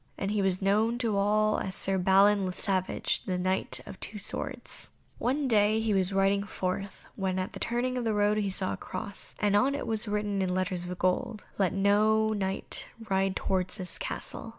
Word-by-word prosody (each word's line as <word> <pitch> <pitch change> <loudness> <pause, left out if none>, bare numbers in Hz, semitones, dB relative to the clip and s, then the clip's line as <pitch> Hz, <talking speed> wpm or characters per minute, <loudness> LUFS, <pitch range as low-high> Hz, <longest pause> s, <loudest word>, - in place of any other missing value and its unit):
And 195 +1 -2
he 210 -1 +1
was 190 -1 +2
known 215 +4 +2
to 230 -4 0
all 215 +2 +2
as 190 0 -3
Sir 195 0 +1
Balin 195 +1 +4
le 185 - -3
Savage, 185 -1 -1
the 185 -1 -1
Knight 185 +1 0
of 195 -2 -10
the - - -1
two 210 - -9
swords. 200 - -3 0.3
One 275 +3 0
day 215 -2 +3
he 220 -1 0
was 190 -1 +1
riding 195 +1 +2
forth 195 0 -4
when 190 -1 -1
at 185 +1 -3
the - - -7
turning 250 +2 -1
of 235 - -2
a - - +2
road 205 +1 +2
he 205 -2 0
saw 190 0 -1
a - - -5
cross, 195 +2 -5
and 205 -1 +2
on 265 +7 +3
it 285 - -4
was 220 0 0
written 205 -1 -1
in 185 -1 0
letters 185 -1 -1
of 180 0 -5
gold, 185 +4 -1
"Let 190 -3 +3
no 215 +2 +3
Knight 195 -3 0 0.2
ride 190 0 +2
towards 185 +1 -1
this 185 -3 -5
castle." - - -5
200 Hz, 205 wpm, -29 LUFS, 190-215 Hz, 0.3 s, Balin